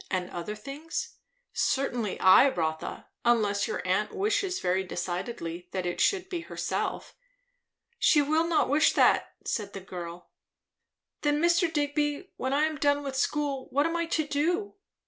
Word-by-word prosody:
and 185 -1 -2
other 175 +5 -5
things? 280 +9 -6 0.4
Certainly 245 -6 0
I, 190 +9 +7
Rotha, 160 -7 -3 0.2
unless 210 -4 +2
your - - -4
aunt 200 +3 +1
wishes 395 -2 0
very 185 +1 +1
decidedly 175 -1 -4
that 185 -1 -2
it 175 - -2
should 380 -2 +2
be 360 -3 -3
herself." 335 - -3 0.9
"She 300 - +5
will 310 +3 +2
not 335 -2 +2
wish 295 +3 +4
that," - - +3
said 205 -4 -3
the 195 - -5
girl. 175 -2 -8 0.9
"Then, 295 0 +2
Mr. 345 +1 +3
Digby, 295 +3 -1
when 260 - -2
I 285 +2 +2
am 310 -1 0
done 285 0 +2
with 275 -1 -4
school 280 -1 -1
what 285 +2 +2
am 330 +1 0
I 335 0 0
to 315 -2 0
do? 345 +8 0
280 Hz, 155 wpm, -28 LUFS, 190-315 Hz, 0.9 s, I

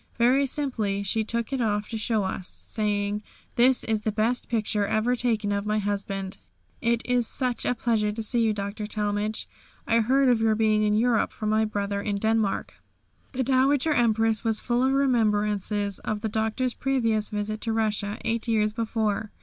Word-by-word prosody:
Very 255 +4 +3
simply 225 -8 -2
she 220 +3 0
took 235 +3 -3
it 265 - 0
off 210 -2 0
to 225 - -3
show 220 -1 0
to - - -2
us, 185 -1 -5
saying, 205 -1 -2 0.3
"This 250 +1 +4
is 220 -2 -1
the 215 - -1
best 225 +4 -1
picture 210 -3 0
ever 220 +4 +1
taken 225 -4 0
of 200 +1 -1
my 215 0 +1
husband. 195 -2 -3 0.4
It 235 0 +1
is 245 -2 +1
such 250 -3 -1
a 250 - +1
pleasure 220 -3 +1
to 220 +2 -4
see 235 +2 0
you, 225 -1 +3
Dr. 205 +1 -4
Talmage, 210 0 -2 0.4
I 230 0 +3
heard 265 +4 +3
of 240 -3 +3
your 220 -1 +3
being 215 -1 +2
in 210 0 +2
Europe 230 +1 +2
from 215 - -4
my 220 +1 +2
brother 200 -1 -2
in 205 0 -2
Denmark." 220 -1 -1 0.5
The 260 0 0
Dowager 270 +4 +2
Empress 225 -3 +2
was 225 -2 +1
full 240 +1 0
of 265 - +3
remembrances 210 -6 +1
of 215 -1 -3
the 220 - -2
Doctor's 220 +4 -1
previous 230 -5 +1
visit 210 +1 -3
to 225 - -2
Russia, 215 -2 -1
eight 230 +1 -1
years 215 -2 +1
before. 220 -2 -1
220 Hz, 185 wpm, -26 LUFS, 210-235 Hz, 0.5 s, This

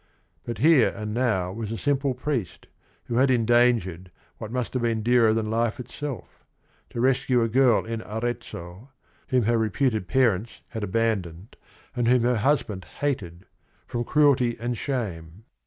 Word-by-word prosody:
But 115 -2 -4
here 150 -2 +5
and 105 -1 -5
now 110 -7 0
was 110 0 -5
a 115 - -3
simple 140 -1 0
priest 125 - -3 0.4
who 120 - -3
had 130 +2 +4
endan 120 0 +4
gered 90 -1 -9 0.3
what 110 - -7
must 125 -1 -3
have 130 - -1
been 115 -2 0
dearer 120 -1 +4
than 110 -1 -1
life 115 +1 0
itself, 130 -2 -7 0.5
to - - -6
rescue 130 -1 +2
a - - +1
girl 125 0 +3
in 115 0 -4
Arezzo, 110 -2 -6 0.4
whom 125 -2 +2
her 115 +2 +2
reputed 110 -2 0
parents 115 -4 +1
had 110 -3 -5
abandoned 105 -2 -2 0.4
and 120 -2 0
whom 125 -1 +4
her 125 0 +2
husband 110 -6 0
hated, 95 -11 -4 0.4
from 120 0 -3
cruelty 135 -4 +3
and 120 +1 -2
shame. 100 - -4
115 Hz, 155 wpm, -25 LUFS, 105-125 Hz, 0.5 s, here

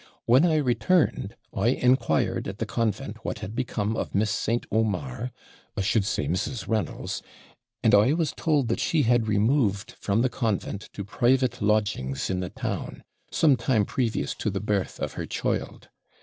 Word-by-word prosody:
When 130 +9 +5
I 160 - +2
returned, 145 - +1 0.2
I 100 +4 0
inquired 125 - +2
at - - -5
the - - -2
convent 115 -3 -2
what - - -3
had 105 - -6
become 110 -3 -1
of - - -3
Miss 105 +2 +2
St. 115 +2 -1
Omar 120 +3 -1 0.5
I - - +1
should 100 +1 +2
say 75 - -1
Mrs. 95 - -2
Reynolds; 110 -2 -2 0.6
and - - +4
I 105 +7 +6
was 165 -1 0
told 150 -6 +1
that 115 - 0
she 160 -4 +2
had 120 -2 +3
removed 105 -1 +1
from 105 +3 +1
the - - +4
convent 110 -4 -2
to 100 - -5
private 125 +3 +1
lodgings 105 -11 0
in 90 - -1
the 90 -1 -3
town, - - -5 0.3
some 150 -4 +4
time 115 -3 +1
previous 120 -2 -1
to 110 - +1
the 95 -1 -2
birth 100 -2 -1
of - - -3
her - - -5
child. - - -3
115 Hz, 170 wpm, -26 LUFS, 100-130 Hz, 0.6 s, I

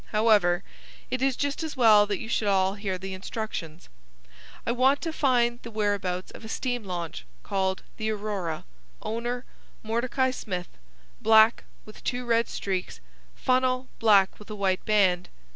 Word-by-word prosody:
However, 205 -5 +3 0.5
it 255 - -1
is 270 -1 +2
just 285 +2 -2
as 315 -3 -5
well 215 -4 +6
that 205 -2 -1
you 220 - -7
should 220 -2 0
all 190 -1 +3
hear 200 -2 -3
the 190 +1 -6
instructions. 185 -4 -6 0.8
I - - +1
want 260 +4 +3
to 325 -2 -3
find 240 -5 +2
the 230 - -8
whereabouts 200 -4 -1
of - - -12
a - - -7
steam 245 0 -2
launch 175 - -5 0.2
called 190 -1 -1
the 220 0 -2
Aurora, 205 -6 -3 0.4
owner 240 +3 -3 0.4
Mordecai 245 +4 0
Smith, 180 -8 -5 0.5
black 220 +1 +5 0.2
with 215 - -13
two 250 -1 -2
red 230 -1 +2
streaks, 185 - -3 0.4
funnel 255 0 +1
black 200 -4 +4
with 210 - -13
a 215 - -5
white 190 -2 0
band. 190 -4 +3
215 Hz, 155 wpm, -27 LUFS, 190-240 Hz, 0.8 s, well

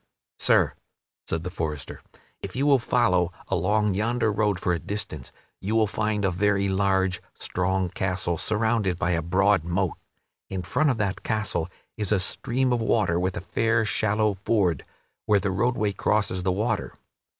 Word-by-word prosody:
"Sir," - - +4 0.5
said 80 0 -2
the 90 - -4
forester, 75 -6 -4 0.4
"if - - -7
you 135 +3 +1
will 140 -2 +5
follow 90 -8 +2 0.2
along 105 +3 +1
yonder 110 +3 +1
road 105 -2 +1
for 90 - 0
a 85 - -1
distance 80 -8 -5 0.3
you 105 +4 -2
will 110 -1 +4
find 105 0 -1
a 95 - +2
very 100 +2 +1
large, 95 -1 +1
strong 95 +1 -1
castle 85 -2 -2
surrounded 110 -4 0
by 85 - 0
a 85 -1 +1
broad 95 +2 +2
moat. 90 +1 -1 0.5
In 95 -2 -3
front 140 - +1
of 130 - +1
that 100 -3 -1
castle 105 -6 -1 0.3
is 105 -2 -3
a 105 - +4
stream 125 +7 0
of 120 - 0
water 105 -6 +2
with 90 0 -1
a - - -3
fair, 110 +3 +1
shallow 105 0 +1
ford, 95 -4 0 0.4
where 105 -1 +4
the 100 0 -1
roadway 105 +1 +1
crosses 100 -3 0
the 90 +1 +1
water. 110 +3 -2
100 Hz, 165 wpm, -25 LUFS, 90-110 Hz, 0.5 s, will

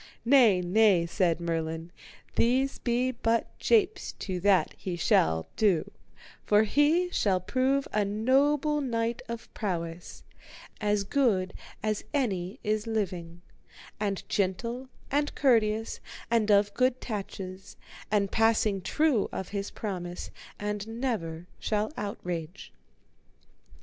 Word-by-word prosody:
Nay, 235 -8 +6
nay, 185 -1 +4
said 170 -1 +1
Merlin, 165 0 -3 0.4
these 260 +3 +2
be 245 +1 +1
but 230 -1 -1
japes 435 -3 +2
to 185 -3 -4
that 195 0 +3
he 185 -2 -4
shall 80 - +2
do; 195 -7 +2 0.5
for 210 +1 +4
he 300 - +2
shall 195 - +2
prove 265 +7 +1
a 210 - +2
noble 275 +8 +2
knight 230 -3 -1
of 235 0 -7
prowess, 170 -4 -4 0.6
as 205 -1 +1
good 200 -6 +1 0.3
as 215 -1 -1
any 200 -4 -1
is 215 +1 -1
living, 180 -6 -3 0.6
and 200 -2 -2
gentle 230 +7 -1 0.2
and 290 +1 0
courteous, 225 -4 +2 0.3
and 225 -2 +2
of 205 0 +4
good 255 +1 +2
tatches, 195 -4 -6 0.3
and 200 -2 +1
passing 220 -3 +2
true 265 - +1
of 190 - -5
his 200 -1 -3
promise, 180 -4 -5 0.3
and 210 0 -3
never 225 -9 -3
shall 215 +2 -1
outrage. 180 -4 -5
210 Hz, 115 wpm, -28 LUFS, 185-240 Hz, 0.6 s, Nay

